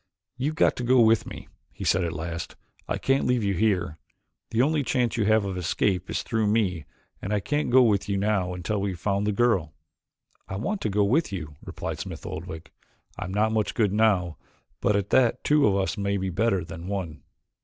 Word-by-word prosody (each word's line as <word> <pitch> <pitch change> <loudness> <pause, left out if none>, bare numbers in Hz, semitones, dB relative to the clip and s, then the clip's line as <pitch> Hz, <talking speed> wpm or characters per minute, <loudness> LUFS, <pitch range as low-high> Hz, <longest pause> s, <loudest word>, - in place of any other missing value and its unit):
"You've 140 +5 -2
got - - +3
to 125 - -3
go 125 +1 +4
with 115 -1 +4
me," - - -9 0.2
he - - -8
said 95 - +2
at 85 - -1
last. 85 +2 -5 0.3
"I - - -1
can't 135 +1 +1
leave 125 -3 +1
you 100 -1 +1
here. 90 -5 0 0.5
The 115 +2 +2
only 150 +1 +2
chance 125 -2 0
you 110 -3 +1
have 110 -1 +3
of 95 -2 -3
escape 90 +1 0
is - - -2
through 110 -3 0
me 100 -7 0 0.4
and 100 - -4
I 105 - +2
can't 145 +8 -1
go 130 +1 +6
with 105 -3 +1
you 100 - +1
now 95 -3 0
until 95 +4 -2
we 100 -1 -1
have 85 - -10
found 100 +2 0
the - - +2
girl." 100 -8 +1 0.7
"I - - -5
want 195 - -2
to - - -1
go 105 +1 +2
with 135 +10 +1
you," 80 -6 -6
replied - - -5
Smith - - -7
Oldwick. 80 0 -7 0.5
"I'm 95 -2 -4
not 105 +3 +1
much 110 -1 -1
good 105 -4 +2
now 100 -6 +2 0.4
but 100 +1 +2
at 100 0 -1
that 125 -3 +3
two 150 -3 +4
of 100 - +2
us 100 +2 -1
may 100 0 0
be 95 -1 -2
better 95 -2 +1
than 85 +1 -8
one." 90 -7 -4
100 Hz, 215 wpm, -26 LUFS, 95-115 Hz, 0.7 s, go